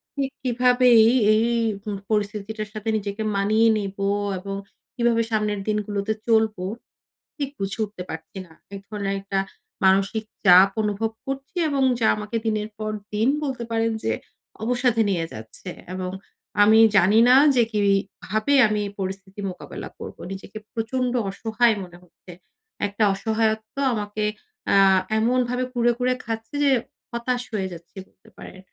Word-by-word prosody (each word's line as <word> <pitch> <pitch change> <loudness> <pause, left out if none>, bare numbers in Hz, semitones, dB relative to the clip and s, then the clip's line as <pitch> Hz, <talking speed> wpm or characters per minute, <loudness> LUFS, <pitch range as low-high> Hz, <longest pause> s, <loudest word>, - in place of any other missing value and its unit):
ঠিক 275 -1 -2
কিভাবে 250 0 +3 0.2
এই, 245 - +4 0.2
এই 220 +2 +3 0.4
হুম 205 -1 -4 0.2
পরিস্থিতিটার 210 +1 -2
সাথে 215 +1 -4
নিজেকে 205 +1 -4
মানিয়ে 215 +3 +3
নিবো 200 -1 -3 0.3
এবং 195 +1 -5 0.4
কিভাবে 235 -2 +2
সামনের 210 -1 0
দিনগুলোতে 210 0 -1
চলবো, 220 -5 +2 0.7
ঠিক 280 -2 -2
বুঝে 195 +2 -3
উঠতে 200 -3 -9
পারছি 160 +4 -8
না। 165 - -21 0.2
১ - - -6
ধরনের 200 -2 -2
একটা 195 0 -2 0.5
মানসিক 195 +3 +3 0.2
চাপ 185 +1 +8
অনুভব 210 +1 -1
করছি 270 +3 -6
এবং 275 -1 0 0.2
যা 220 - +3
আমাকে 215 +2 -4
দিনের 215 -1 -1
পর 215 0 -3 0.2
দিন 215 +3 +1 0.2
বলতে 260 -4 -3
পারেন 225 0 +1
যে - - 0 0.5
অবসাদে 240 -1 +1
নিয়ে 170 -4 0
যাচ্ছে 110 +11 -9 0.3
এবং 185 -1 -4 0.5
আমি 220 +2 +6 0.2
জানি 195 +4 +5
না 250 - +8 0.2
যে 240 - +5
কিভাবে 205 +3 0
আমি 210 0 -1 0.2
পরিস্থিতি 190 +1 -5
মোকাবেলা 180 - -8
করব। - - -8
নিজেকে 195 +2 -8
প্রচন্ড 245 +2 -1 0.2
অসহায় 225 +3 +1
মনে 175 -1 -12
হচ্ছে। 180 +1 -16 0.6
একটা 205 +2 -1
অসহায়ত্ব 220 +1 -1 0.2
আমাকে 210 -1 -3 0.5
আ - - +5 0.4
এমনভাবে 250 +2 +1
কুরে, 240 0 +3
কুরে 255 0 +2
খাচ্ছে 225 +2 -5
যে 280 - +4 0.4
হতাশ 245 +1 -1
হয়ে 195 -3 -1
যাচ্ছি 170 +4 -13
বলতে - - -24
পারেন। 185 - -11
215 Hz, 140 wpm, -23 LUFS, 195-230 Hz, 0.7 s, চাপ